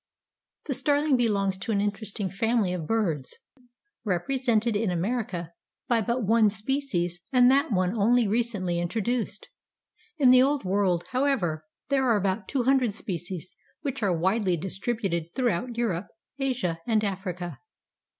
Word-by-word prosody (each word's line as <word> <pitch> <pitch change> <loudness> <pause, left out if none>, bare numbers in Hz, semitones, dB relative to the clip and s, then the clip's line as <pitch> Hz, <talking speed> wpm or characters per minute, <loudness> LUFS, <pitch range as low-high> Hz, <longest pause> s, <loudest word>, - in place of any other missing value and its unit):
The 285 - -1
Starling 285 +2 +2
belongs 200 -6 +1
to 210 - -3
an 205 - +1
interesting 205 0 -2
family 220 -1 +1
of 165 -4 -4
birds, 170 - -1 0.7
represented 230 +3 0
in 210 -1 +1
America 180 -2 -2 0.3
by 235 -2 +2
but 235 +3 -1
one 220 +1 +4
species 210 -6 -2
and 250 -1 +6
that 280 +1 +2
one 185 +1 +1
only 230 +2 +3
recently 205 -6 0
introduced. 225 +6 -2 0.7
In 265 -5 +6
the 255 0 +7
Old 275 0 +2
World, 185 -2 +1
however, 235 - 0 0.2
there 275 -1 +2
are 230 -4 +4
about 195 0 -1
two 265 -3 0
hundred 255 -5 +2
species 180 -3 -5 0.3
which 275 -3 -3
are 190 -5 +1
widely 190 0 +1
distributed 190 -2 -3
throughout 240 -1 -1
Europe, 200 -6 -1 0.3
Asia 245 -12 -1
and 220 -2 +2
Africa. 185 -3 -4
215 Hz, 140 wpm, -27 LUFS, 185-245 Hz, 0.7 s, the